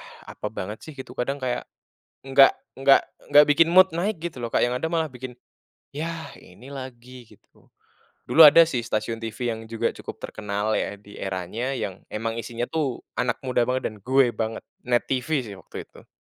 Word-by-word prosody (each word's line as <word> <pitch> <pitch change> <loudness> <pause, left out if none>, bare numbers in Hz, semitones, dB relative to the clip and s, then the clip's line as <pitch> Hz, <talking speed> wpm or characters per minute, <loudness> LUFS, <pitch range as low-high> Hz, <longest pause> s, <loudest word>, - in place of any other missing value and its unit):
ah, - - -13
apa - - -4
banget 105 +4 -6
sih 155 - -9
gitu 130 -2 -8
kadang 135 +3 -2
kayak, 130 -2 -2 0.6
enggak 135 0 +6 0.2
enggak 135 0 +6 0.3
enggak 145 +1 +9
bikin 165 +3 +5
mood 185 +1 +7
naik 195 +5 0
gitu 170 -6 -5
loh - - -1
Kak, - - +3
yang 120 - -1
ada 160 - -2
malah 165 -2 +1
bikin, 125 0 -8 0.6
"Yah 165 +2 -4
ini 130 - -15
lagi." 125 -2 -9
gitu. - - -23 0.6
Dulu 165 - +7
ada 160 +3 +9
sih 125 -7 -2
stasiun 115 0 -2
TV 110 -1 -6 0.2
yang 110 - -8
juga 115 -1 0
cukup - - -8
terkenal 105 0 -3
ya 100 - -3
di 100 0 -15
eranya, 95 +7 -3
yang 95 -6 -4
emang 115 +1 -3
isinya 115 +2 -4
tuh 150 -6 -2 0.2
anak 120 -1 +1
muda 125 -2 +1
banget 130 0 0
dan 110 - -13
gue 130 -1 +4
banget, 110 0 -3 0.2
NET 120 -1 +2
TV 130 0 -1 0.2
sih 100 - -8
waktu 90 - -9
itu. - - -17
125 Hz, 190 wpm, -25 LUFS, 115-140 Hz, 0.6 s, enggak